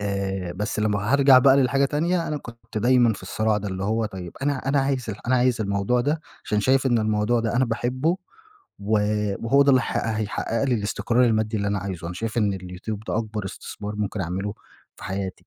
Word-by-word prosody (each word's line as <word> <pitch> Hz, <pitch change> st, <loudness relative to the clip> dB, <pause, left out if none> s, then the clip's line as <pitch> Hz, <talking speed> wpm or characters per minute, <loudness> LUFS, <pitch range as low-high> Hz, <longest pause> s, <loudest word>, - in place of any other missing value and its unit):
آآ، 95 Hz, -3 st, -2 dB
بس 105 Hz, +5 st, -3 dB
لمّا 105 Hz, +1 st, 0 dB
هارجع 140 Hz, -2 st, +7 dB
بقى 135 Hz, +1 st, +6 dB
للحاجة 135 Hz, +1 st, +3 dB
تانية 165 Hz, +5 st, 0 dB
أنا 150 Hz, -, -2 dB
كنت 115 Hz, -4 st, -8 dB
دايمًا 120 Hz, +1 st, +4 dB
في 100 Hz, -, -9 dB
الصراع 110 Hz, +3 st, 0 dB
ده 105 Hz, 0 st, -4 dB
اللي 95 Hz, 0 st, -4 dB
هو 110 Hz, +2 st, 0 dB
طيب 95 Hz, -5 st, -8 dB
أنا 140 Hz, -2 st, -1 dB
أنا 140 Hz, 0 st, +3 dB
عايز 135 Hz, -4 st, -1 dB
ال 105 Hz, +2 st, -9 dB
أنا 130 Hz, +1 st, +3 dB
عايز 125 Hz, -2 st, +2 dB
الموضوع 100 Hz, +4 st, +1 dB
ده 145 Hz, +5 st, 0 dB, 0.2 s
عشان 105 Hz, -, 0 dB
شايف 130 Hz, +4 st, +3 dB
إن 120 Hz, -3 st, +3 dB
الموضوع 110 Hz, +2 st, +1 dB
ده 115 Hz, 0 st, -1 dB
أنا 130 Hz, -, +4 dB
باحبه 130 Hz, +8 st, 0 dB, 0.6 s
و 105 Hz, +2 st, +1 dB, 0.5 s
وهو 140 Hz, +5 st, +5 dB
ده 140 Hz, -, +4 dB
اللي 130 Hz, -1 st, +5 dB
ه -, -, -2 dB
هيحقق 110 Hz, +2 st, -1 dB
لي 130 Hz, -2 st, +2 dB
الاستقرار 115 Hz, +3 st, +1 dB
المادي 110 Hz, -1 st, +1 dB
اللي 100 Hz, 0 st, -1 dB
أنا 100 Hz, 0 st, 0 dB
عايزه، 90 Hz, -3 st, -5 dB
أنا 85 Hz, -, -5 dB
شايف 115 Hz, +4 st, -3 dB
إن 105 Hz, -3 st, +2 dB
اليوتيوب 95 Hz, +3 st, -6 dB
ده -, -, 0 dB
أكبر 110 Hz, -2 st, -4 dB
استثمار 105 Hz, +2 st, -7 dB
ممكن 105 Hz, 0 st, -2 dB
أعمله 95 Hz, +4 st, -3 dB, 0.4 s
في -, -, -11 dB
حياتي، 95 Hz, -1 st, -5 dB
110 Hz, 210 wpm, -24 LUFS, 100-130 Hz, 0.6 s, هارجع